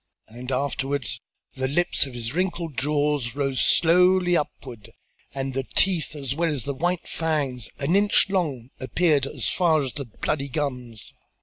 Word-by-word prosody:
And 125 +3 -7
afterwards, 135 -2 -2 0.3
the 130 0 -2
lips 150 0 +1
of 130 - -10
his 120 +1 -4
wrinkled 170 -3 -2
jaws 145 -2 0
rose 135 -2 0
slowly 180 +1 +4
upward 120 -8 -4 0.4
and 135 -1 -3
the 135 - 0
teeth 175 -5 +2
as 135 -3 -2
well 165 +3 0
as 140 -6 -3
the 140 - -3
white 175 +5 -1
fangs, 145 -8 -2
an 145 +6 +1
inch 205 0 +4
long, 145 -11 -2
appeared 140 +1 +2
as - - -3
far 160 -5 +3
as 130 - -5
the 140 - -5
bloody 140 +5 -2
gums. 125 -6 -4
140 Hz, 155 wpm, -25 LUFS, 130-165 Hz, 0.4 s, slowly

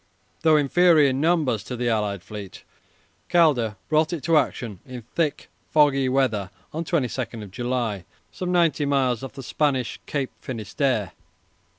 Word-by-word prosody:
Though 155 -1 +5
inferior 150 0 +4
in 130 +2 -2
numbers 155 - +1
to 125 - -5
the 120 0 -2
allied 105 -5 -1
fleet, 105 -3 -9 0.7
Calder 140 -11 +3
brought 155 +1 +2
it 170 -5 -4
to 165 -1 +2
action 115 - 0
in 125 -3 -9
thick, 150 +6 -2 0.2
foggy 140 -3 +3
weather 120 -8 +1 0.2
on 160 +2 -2
22 125 - -2
July, 120 -4 -2 0.3
some 180 -1 -4
ninety 165 -4 +2
miles 130 -4 +1
off 135 - -7
the 135 -1 -8
Spanish 130 -2 -1
Cape 140 -3 -2
Finisterre. 110 -2 -2
130 Hz, 145 wpm, -24 LUFS, 115-155 Hz, 0.7 s, Though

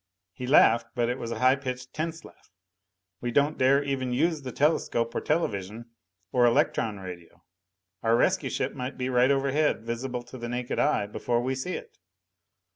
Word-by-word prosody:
He 125 - -6
laughed, 115 -4 +5
but 120 -1 +1
it 125 - -2
was 115 - -5
a 115 - -3
high 130 +1 +4
pitched, 125 -2 -6
tense 165 +1 -4
laugh. - - -17 0.7
"We 120 - -3
don't 145 +5 +1
dare 135 +2 +4
even 135 -2 -2
use 155 +4 +1
the 130 -2 -6
telescope 120 -5 +1
or - - -2
television. 115 - -2 0.4
Or 125 -1 +4
electron 110 -3 +1
radio. 90 -2 -10 0.6
Our 115 0 +3
rescue - - +2
ship - - -2
might 125 +2 -5
be 125 0 -2
right 125 0 +4
overhead, 140 -1 +1
visible 120 +1 -3
to 125 +2 -11
the 120 0 -5
naked 125 0 -3
eye, 150 -8 +2
before 120 +3 -1
we 130 +1 0
see 135 +8 -4
it. 465 - -10
125 Hz, 180 wpm, -27 LUFS, 115-140 Hz, 0.7 s, laughed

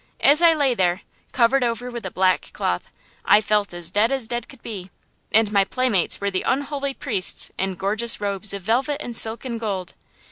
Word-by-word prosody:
As 295 +4 +6
I 335 -1 +5
lay 280 -4 +2
there, 180 -4 0 0.3
covered 255 +1 +2
over 240 +1 -3
with 235 -1 -6
a - - -5
black 185 0 0
cloth, - - -3 0.3
I 210 - +5
felt 210 -2 0
as 175 -1 -1
dead 210 +5 +2
as 265 -4 -1
dead 240 +1 -5
could 265 -3 -16
be; 195 -5 -8 0.4
and 220 -1 +3
my 200 -2 +3
playmates 220 -3 0
were 200 0 -2
the 185 - -2
unholy 280 0 -2
priests 205 -9 +1
in 190 -1 -3
gorgeous 210 +5 +2
robes 200 0 +1
of 200 -2 -4
velvet 260 +8 0
and 240 -5 -7
silk 225 +3 +2
and 235 -3 -5
gold. 195 -5 -4
225 Hz, 200 wpm, -22 LUFS, 195-255 Hz, 0.4 s, As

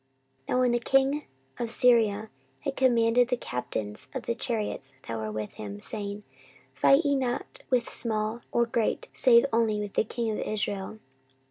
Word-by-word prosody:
14:018:030 - - +2
Now 245 - +3
the 240 - +2
king 270 +3 +3 0.4
of 235 - -2
Syria 220 -3 +3 0.3
had 275 - -3
commanded 240 -1 +4
the 250 0 0
captains 120 - -4
of 260 - -3
the 235 - -1
chariots 215 - -3
that 115 - -3
were 110 -1 -3
with 105 0 -4
him, 100 -1 -7
saying, 205 - -5 0.5
Fight 275 +4 +4
ye 285 0 +3
not 265 - -3
with 245 -3 +2
small 220 0 -2
or 235 - +3
great, 230 -1 -1
save 235 0 +6
only 225 -2 +2
with 205 -1 -4
the - - +3
king 230 +1 -2
of 215 - -3
Israel. 205 -1 -2
230 Hz, 165 wpm, -28 LUFS, 205-245 Hz, 0.5 s, save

